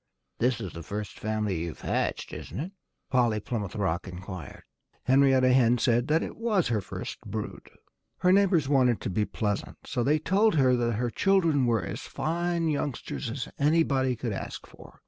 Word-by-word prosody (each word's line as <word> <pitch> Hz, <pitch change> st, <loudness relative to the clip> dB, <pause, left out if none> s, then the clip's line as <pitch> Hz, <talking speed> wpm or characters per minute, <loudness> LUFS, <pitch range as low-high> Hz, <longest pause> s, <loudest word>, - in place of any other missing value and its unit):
"This 125 Hz, +1 st, +2 dB
is 95 Hz, -6 st, -6 dB
the 85 Hz, -, -7 dB
first 105 Hz, +4 st, -6 dB
family 105 Hz, -4 st, -1 dB
you've 85 Hz, -1 st, -5 dB
hatched, -, -, -2 dB
isn't -, -, -6 dB
it?" 170 Hz, +6 st, -4 dB, 0.4 s
Polly 120 Hz, -4 st, +3 dB
Plymouth 105 Hz, -2 st, -4 dB
Rock 95 Hz, -4 st, -1 dB
inquired. 90 Hz, 0 st, -8 dB, 0.4 s
Henrietta 130 Hz, -1 st, +4 dB
Hen 125 Hz, -2 st, +4 dB
said 120 Hz, +1 st, +2 dB
that 160 Hz, +2 st, +2 dB
it -, -, -6 dB
was 215 Hz, -, +1 dB
her 110 Hz, -3 st, +1 dB
first 90 Hz, -, -7 dB
brood. -, -, -6 dB, 0.5 s
Her 180 Hz, -, +3 dB
neighbors 185 Hz, -7 st, +4 dB
wanted 130 Hz, -4 st, +3 dB
to -, -, -3 dB
be 105 Hz, +3 st, +1 dB
pleasant. 105 Hz, -2 st, -3 dB
So 125 Hz, -4 st, -1 dB
they 150 Hz, +5 st, +3 dB
told 195 Hz, +5 st, +2 dB
her 130 Hz, -4 st, +4 dB
that 120 Hz, -1 st, 0 dB
her 120 Hz, +2 st, -1 dB
children 165 Hz, -, +3 dB
were 115 Hz, -5 st, +2 dB
as -, -, -5 dB
fine 170 Hz, +1 st, -1 dB
youngsters 145 Hz, -3 st, -2 dB
as 125 Hz, +2 st, -4 dB
anybody 140 Hz, -4 st, +2 dB
could 115 Hz, -2 st, -3 dB
ask -, -, -6 dB
for. -, -, -16 dB
125 Hz, 175 wpm, -28 LUFS, 110-155 Hz, 0.5 s, Henrietta